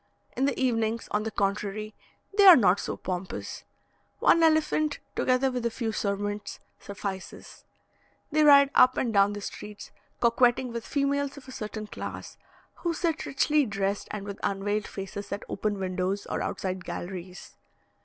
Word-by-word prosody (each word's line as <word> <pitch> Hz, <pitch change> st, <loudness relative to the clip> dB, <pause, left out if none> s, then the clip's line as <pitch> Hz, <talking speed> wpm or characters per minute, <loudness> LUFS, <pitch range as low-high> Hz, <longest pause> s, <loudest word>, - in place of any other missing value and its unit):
In 265 Hz, -, +1 dB
the 280 Hz, -3 st, -1 dB
evenings, 230 Hz, -3 st, 0 dB
on 210 Hz, -, +1 dB
the 220 Hz, -, -3 dB
contrary, 210 Hz, +1 st, -2 dB, 0.4 s
they 405 Hz, -1 st, +7 dB
are 365 Hz, -, +12 dB
not 195 Hz, -5 st, +4 dB
so -, -, -4 dB
pompous 185 Hz, 0 st, -5 dB, 0.5 s
one 335 Hz, -, +4 dB
elephant, 310 Hz, -2 st, +2 dB, 0.2 s
together 255 Hz, +1 st, +2 dB
with 250 Hz, -1 st, -3 dB
a 235 Hz, -, +1 dB
few 230 Hz, -1 st, -3 dB
servants, 205 Hz, 0 st, -3 dB, 0.2 s
suffices; 195 Hz, -2 st, -7 dB, 0.7 s
they 310 Hz, +1 st, +3 dB
ride 280 Hz, -2 st, +7 dB
up 255 Hz, 0 st, +6 dB
and 235 Hz, -3 st, 0 dB
down 200 Hz, 0 st, +4 dB
the 205 Hz, -, -6 dB
streets, 210 Hz, +1 st, -8 dB, 0.3 s
coquetting 240 Hz, +1 st, +3 dB
with 235 Hz, -1 st, -5 dB
females 280 Hz, 0 st, 0 dB
of 270 Hz, -, -12 dB
a -, -, -9 dB
certain 215 Hz, -2 st, -5 dB
class, -, -, -7 dB, 0.4 s
who 340 Hz, -1 st, -2 dB
sit 330 Hz, -1 st, -1 dB
richly 295 Hz, +2 st, +2 dB
dressed 200 Hz, -1 st, -2 dB
and 205 Hz, -1 st, -5 dB
with 200 Hz, -1 st, -7 dB
unveiled 205 Hz, +1 st, -1 dB
faces 195 Hz, +1 st, -7 dB
at 200 Hz, -, -3 dB
open 205 Hz, +1 st, -2 dB
windows 190 Hz, +1 st, -2 dB
or -, -, -3 dB
outside 185 Hz, -1 st, -3 dB
galleries. 180 Hz, 0 st, -7 dB
215 Hz, 155 wpm, -27 LUFS, 200-265 Hz, 0.7 s, are